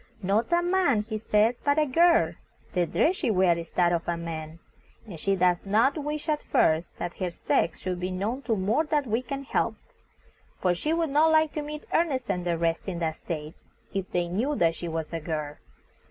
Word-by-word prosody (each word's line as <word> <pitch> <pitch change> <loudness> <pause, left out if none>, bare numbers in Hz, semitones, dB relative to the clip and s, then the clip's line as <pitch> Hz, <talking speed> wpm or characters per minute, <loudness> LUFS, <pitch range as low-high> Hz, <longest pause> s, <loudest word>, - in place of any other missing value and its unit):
"Not 205 - +1
a 345 0 +3
man," 350 - +2
he 215 0 -4
said, 220 +2 +2
"but 285 +1 +2
a 305 - +4
girl. 295 - +4 0.4
The 175 -2 +1
dress 355 - +2
she 330 - -1
wears 185 -4 +3
is 165 - -7
that 175 -1 +3
of 170 -1 -2
a 170 -1 0
man, 160 -1 -6 0.5
and 185 -8 -9
she 195 +4 +1
does 180 -1 +2
not 220 +7 +3
wish 300 -1 -4
at 305 -1 0
first 160 +2 +1
that 175 - -5
her 185 -2 -1
sex 165 -1 0
should 180 -1 -4
be 180 +1 -2
known 205 +8 -2
to 225 - +3
more 215 +10 +1
that 300 -2 0
we 225 +1 0
can 275 +2 -5
help, - - 0 0.8
for 180 -1 +2
she 300 - -2
would 330 -2 0
not 305 +3 +4
like 315 -1 +3
to 305 - -2
meet 300 +1 -7
Ernest 285 -7 +1
and 180 -1 -3
the 170 -1 0
rest 165 +2 -1
in 185 -3 -3
that 160 -2 -2
state, 155 -2 -5 0.4
if 195 -1 -3
they 175 -1 0
knew 235 +12 -1
that 165 -9 +3
she 170 - -6
was 160 -1 -4
a 165 - -1
girl. 150 -2 -4
195 Hz, 215 wpm, -27 LUFS, 170-285 Hz, 0.8 s, a